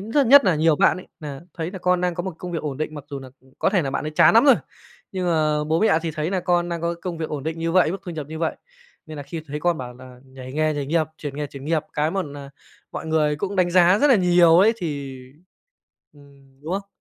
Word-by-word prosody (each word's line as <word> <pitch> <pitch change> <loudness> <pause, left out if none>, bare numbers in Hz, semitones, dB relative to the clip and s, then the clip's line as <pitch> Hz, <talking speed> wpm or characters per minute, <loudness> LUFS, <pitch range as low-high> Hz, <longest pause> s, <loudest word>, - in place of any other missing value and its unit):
rất 235 +7 +1
nhất 280 +4 +8
nà 185 - +3
nhiều 160 0 +3
bạn - - +3
ấy 185 - -10
nà 140 -3 -7
thấy 165 0 -4
nà 190 - -7
con 180 0 +1
đang 180 -1 0
có 175 - -3
một 185 -2 -5
công 180 -1 -7
việc 165 - -3
ổn 145 -3 -4
định, 155 +1 -4
mặc 145 -2 -8
dù 140 - -5
nà 135 -1 -10
cũng 130 0 -25
có - - +1
thể 190 -4 +2
nà 135 - -3
bạn - - -3
ấy 155 - -3
chán 155 - +5
nắm 230 - +6
rồi, 275 -3 +7 0.6
nhưng 185 -2 -2
mà 155 -3 +1
bố 160 +2 0
mẹ 210 -7 +4
thì 165 - -2
thấy 155 +2 -3
nà 190 -1 0
con 175 -1 +1
đang 170 -1 -3
có 170 0 -1
công 175 -3 -4
việc 160 - -3
ổn 145 -3 -5
định 160 +2 -4
như 165 0 -2
vậy, 180 -3 +4
mức 195 - -4
thu 175 - -6
nhập 155 -4 -6
như 160 - -7
vậy, 165 -1 -1 0.5
nên 155 - -9
nà 145 - -6
khi 155 +3 -7
thấy 150 +2 -5
con 175 -1 +1
bảo 125 -1 -7
là 125 0 -14
nhảy 130 -1 -11
nghề, 155 +1 0
nhảy 145 -1 -3
nghiệp, 160 +1 +1
chuyển 145 -2 -6
nghề, 150 0 -3
chuyển 140 -1 -11
nghiệp 155 0 0
cái 150 +1 0
một 195 +2 -1
nà 140 -2 -9 0.4
mọi - - -6
người 150 -2 +1
cũng 200 +5 -4
đánh 175 -1 +2
giá 180 +2 +5
rất 290 - +4
là 260 - +6
nhiều 175 -3 +5
ấy 210 +5 +5
thì 145 -8 -5 1.0
ừm, 140 -2 -21
đúng 160 +4 -5
không? 195 +1 -3
160 Hz, 285 wpm, -22 LUFS, 145-180 Hz, 1.0 s, nhất